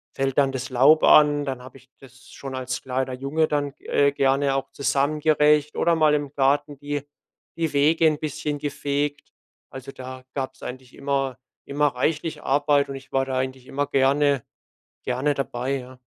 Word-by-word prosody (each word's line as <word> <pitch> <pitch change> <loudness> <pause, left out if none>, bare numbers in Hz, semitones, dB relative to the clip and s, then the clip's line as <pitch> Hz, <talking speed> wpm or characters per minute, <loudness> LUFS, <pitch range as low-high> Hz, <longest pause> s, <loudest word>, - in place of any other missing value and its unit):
fällt 135 -1 -1
dann 135 -1 +3
das 130 0 -5
Laub 140 +5 +5
an, 145 -1 +6
dann 130 -2 -4
habe 130 +1 -12
ich 130 0 -21
das 125 -1 -17
schon 135 -1 -7
als 130 0 -4
kleiner 130 0 -2
Junge 140 +5 0
dann, 145 -2 -1
äh, 140 0 +2
gerne 135 0 +1
auch 135 0 -3
zusammen 140 +2 0
gerecht 150 -1 +3
oder 170 - +3
mal 155 -2 +4
im 145 -1 -3
Garten 145 +1 +1
die 145 0 -4 0.5
die 165 -2 -1
Wege 155 +3 +4
'n 155 -1 +1
bisschen 150 -1 -3
gefegt. 145 0 -3 0.4
Also, 135 +1 -9
da 130 -1 -9
gab's 130 -1 -5
eigentlich 130 0 -8
immer 135 -2 -2 0.3
immer 145 +1 +1
reichlich 150 +4 -2
Arbeit 145 0 +2
und 135 - -5
ich 135 0 -11
war 135 0 +1
da 130 -1 -3
eigentlich 130 0 -4
immer 145 +1 -1
gerne 140 0 +2 0.6
gerne 130 +4 0
dabei, 135 -1 -2
ja. 130 0 -11
140 Hz, 175 wpm, -24 LUFS, 130-145 Hz, 0.6 s, an